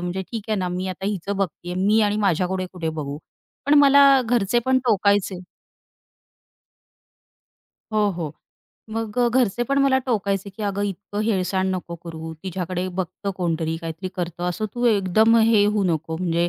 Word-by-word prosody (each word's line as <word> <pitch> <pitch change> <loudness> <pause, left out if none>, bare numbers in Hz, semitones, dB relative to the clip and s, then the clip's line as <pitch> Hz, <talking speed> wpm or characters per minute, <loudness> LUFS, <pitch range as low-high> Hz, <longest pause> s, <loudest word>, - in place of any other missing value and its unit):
म्हणजे 180 +2 -3
ठीक 225 -3 -4
आहे 215 - +1
ना, 180 -1 -1
मी 180 +1 -3
आता 190 +1 -5
हिचं 200 0 -2
बघतेय 180 -2 -3
मी 215 +2 +4
आणि 205 0 +1
माझ्याकडे 185 -2 0
कुठे 175 -3 -4
बघू, 150 -2 -4 0.5
पण 290 - +5
मला 280 -1 +7
घरचे 240 -1 +2
पण 260 0 +4
टोकायचे. 200 -3 +2 2.5
हो, 210 -1 +2
हो, 160 -4 -4 0.6
मग 225 +1 -3
अ, 240 -1 +4
घरचे 240 -2 +1
पण 275 +3 0
मला 270 -1 +4
टोकायचे, 200 -4 -1
की 205 +3 -9
"अगं 200 0 -1
इतकं 205 +1 -4
हेळसांड 190 -3 0
नको 175 -1 -5
करू. 160 -1 -7
तिच्याकडे 185 0 -3
बघतं 190 +2 -4
कोणतरी, 165 -2 -1
काहीतरी 165 +2 -6
करतं, 175 -1 -4
असं 215 +5 -2
तू 245 0 -2
एकदम 220 +2 +4
हे 220 -2 +5
होऊ 210 0 +1
नको." 160 -1 -1
म्हणजे 170 0 0
195 Hz, 160 wpm, -23 LUFS, 175-215 Hz, 2.5 s, मला